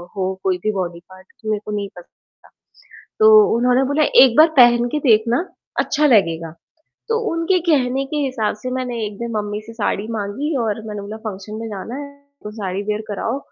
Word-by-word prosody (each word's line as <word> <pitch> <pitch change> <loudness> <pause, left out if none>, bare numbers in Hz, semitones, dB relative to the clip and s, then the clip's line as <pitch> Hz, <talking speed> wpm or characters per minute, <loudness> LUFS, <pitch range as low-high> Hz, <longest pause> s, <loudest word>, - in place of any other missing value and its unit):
हो 190 -1 -1
कोई 185 -1 +1
भी 215 - +1
बॉडी 175 -3 -3
पार्ट, 185 0 -16
तो 220 - -5
मेरे 210 - -1
को 210 - -5
नहीं 200 -1 -4
पसंद 175 - -14 0.3
आता। - - -19 0.7
तो 435 - +6 0.3
उन्होंने 250 +2 +3
बोला, 305 +1 +2 0.2
"एक 250 -3 +3
बार 315 - +8
पहन 240 -1 +6
के 300 - -1
देखना, 235 -1 +3 0.4
अच्छा 300 +1 +1
लगेगा," 165 - +2 0.6
तो 455 0 +1
उनके 335 +3 +1
कहने 270 -2 +1
के 300 - -5
हिसाब 255 -6 -1
से 255 - -4
मैंने 250 -2 -4
एक 205 -1 -8
दिन 235 0 -4
मम्मी 210 0 -3
से 230 - -10
साड़ी 210 -2 -2
माँगी 225 +9 -3
और 220 -1 -2
मैंने 210 -1 -5
बोला 205 +2 -7
फंक्शन 205 +1 -7
में 225 - -5
जाना 210 +4 -7
है, 285 0 -7 0.3
तो 210 - -5
साड़ी 195 -3 -4
वियर 210 +1 -2
कराओ। 225 +5 -2
220 Hz, 200 wpm, -20 LUFS, 200-255 Hz, 0.7 s, बार